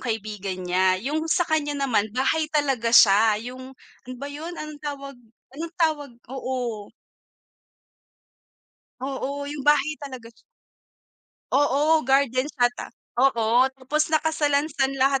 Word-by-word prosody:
kaibigan 210 -5 -4
niya, 185 +1 +2
yung 300 +7 -2
sa 350 +2 +2
kanya 305 -2 0
naman 245 -7 +1
bahay 310 +5 +2
talaga 270 -6 +1
siya 210 0 +6
yung 260 +1 -10 0.4
ano 255 - -6
ba 280 - -5
yun? 310 +4 -7
Anong 305 -1 -8
tawag 275 -2 -6 0.4
anong 330 +1 -6
tawag 305 -4 +1 0.2
oo. 245 -6 -4 2.1
Oo, 280 +2 -4
yung 290 -2 -6
bahay 295 +1 +3
talaga 260 -6 -9 1.2
Oo, 290 +3 +3
gardens 270 +1 +2
ata 245 0 +1 0.3
oo, 240 -1 +4
tapos 295 +4 0
nakasalansan 295 -3 +1
lahat 270 0 +2
275 Hz, 115 wpm, -24 LUFS, 245-295 Hz, 2.1 s, siya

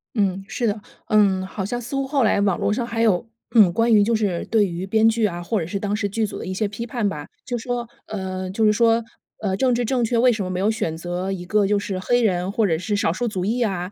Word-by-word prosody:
嗯， 195 -3 0
是 240 - -2
的。 215 -1 0 0.3
嗯， 195 -3 +3
好 190 +1 -5
像 240 +5 -3
似 245 +3 -6
乎 275 0 -1
后 275 -2 +1
来 205 -2 +3
网 195 -3 +2
络 - - +1
上 240 +1 -1
还 230 -1 -2
有， 220 -1 +2 0.3
嗯， 205 -6 +7
关 230 +5 +2
于 210 - +6
就 230 +3 +2
是 200 -6 -1
对 220 -2 +3
于 175 0 -4
编 220 +2 +4
剧 225 0 +2
啊， 175 -4 -2
或 215 +4 -1
者 165 - -3
是 200 +2 -3
当 205 0 -1
时 210 -1 -1
剧 220 +2 0
组 205 - -6
的 - - -6
一 185 - -4
些 205 +2 0
批 210 +3 -6
判 225 -2 -1
吧。 150 -6 -5 0.2
就 245 -1 -2
说， 240 0 -3 0.2
呃， 185 -2 -4
就 220 +4 +1
是 210 - +5
说， 230 +1 +3 0.4
呃， 190 -3 0
政 250 +3 +2
治 240 0 0
正 250 +1 +1
确， 230 +1 +1
为 250 +1 +5
什 215 -4 -2
么 185 - -4
没 185 - -2
有 205 +3 +2
选 165 -7 -2
择 175 +3 -3
一 180 -2 -5
个 205 +1 +2
就 205 - +2
是 195 -2 -3
黑 245 +4 +1
人 185 -2 +1
或 220 +1 +1
者 165 -5 +1
是 185 +5 -2
少 165 -5 +1
数 240 +6 -2
族 185 -4 -2
裔 235 +4 0
啊， 190 -4 -1
210 Hz, 300 characters per minute, -22 LUFS, 190-230 Hz, 0.4 s, 嗯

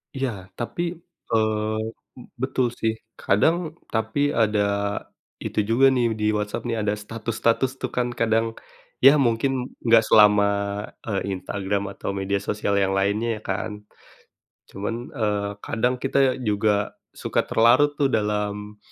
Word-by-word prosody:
Iya, 135 -1 -1 0.3
tapi, 120 +8 -3 0.5
eee, 110 -1 +1 0.4
be 125 - -11 0.2
betul 130 -1 +1
sih. 110 0 +1 0.3
Kadang, 105 +12 +3 0.4
tapi 110 +4 -1
ada 110 -4 +2 0.8
itu - - -2
juga 130 +4 +4
nih 120 -1 +2
di 105 - 0
Whatsapp 105 0 -2
nih, 115 -1 -1
ada 105 0 0
status-status 115 +4 -1
tuh - - -3
kan 125 0 0
kadang. 115 0 +1 0.5
Ya 135 +2 +10
mungkin 120 +2 +2 0.3
nggak 115 -1 +6
selama, 105 -1 +6 0.6
e 110 - -4 0.2
Instagram 100 +1 -2
atau - - -5
media 100 +1 0
sosial 100 0 -1
yang 95 0 +1
lainnya 105 +3 0
ya - - -12
kan. - - -2 1.0
Cuman, 105 +4 -4 0.2
eee, 105 -3 -1
kadang 125 +3 0
kita 135 -1 +2
juga 105 0 +1 0.3
suka - - +1
terlarut 130 +6 +4
tuh 140 - +4
dalam, 105 -1 -2
110 Hz, 135 wpm, -24 LUFS, 105-120 Hz, 1.0 s, Ya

